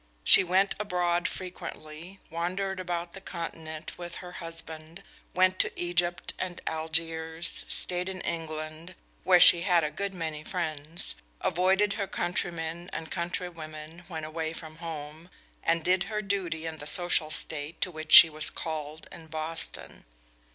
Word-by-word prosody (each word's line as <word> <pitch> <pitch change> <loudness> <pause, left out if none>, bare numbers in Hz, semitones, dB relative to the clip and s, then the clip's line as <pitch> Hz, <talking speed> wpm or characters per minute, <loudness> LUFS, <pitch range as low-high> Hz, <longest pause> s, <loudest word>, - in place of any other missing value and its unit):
She 195 - +8
went 190 +2 +3
abroad 175 -4 +1
frequently, 180 -1 -8
wandered 185 +3 -2
about 175 -1 -3
the 195 - -9
continent 165 -3 -6
with 175 -1 -6
her 180 - -8
husband, 165 +1 -7 0.3
went 185 0 +4
to - - 0
Egypt 175 0 0
and 180 -1 -3
Algiers, 160 +1 -2
stayed 180 +1 -1
in 190 -1 -5
England, 160 +1 -5 0.3
where 180 -1 +6
she 175 -1 +9
had 175 -3 +4
a 150 - -1
good 200 +4 -3
many 160 -3 -4
friends, 160 -2 -3 0.3
avoided 190 +4 +2
her 195 - -1
countrymen 170 -1 -2
and 160 -1 -6
countrywomen 170 -2 -5
when 160 -4 -5
away 160 +1 -3
from 160 -1 -9
home, 160 0 -7 0.3
and 165 -1 +2
did 185 +2 +2
her 210 +1 -3
duty 185 -5 -2
in 160 -1 -5
the 145 - -6
social 175 -1 +4
state 155 0 -2
to 185 - +1
which 155 -1 -7
she - - +13
was 155 -1 +2
called 155 -1 -5
in 165 -1 -11
Boston. 160 +1 -3
170 Hz, 145 wpm, -29 LUFS, 160-180 Hz, 0.3 s, she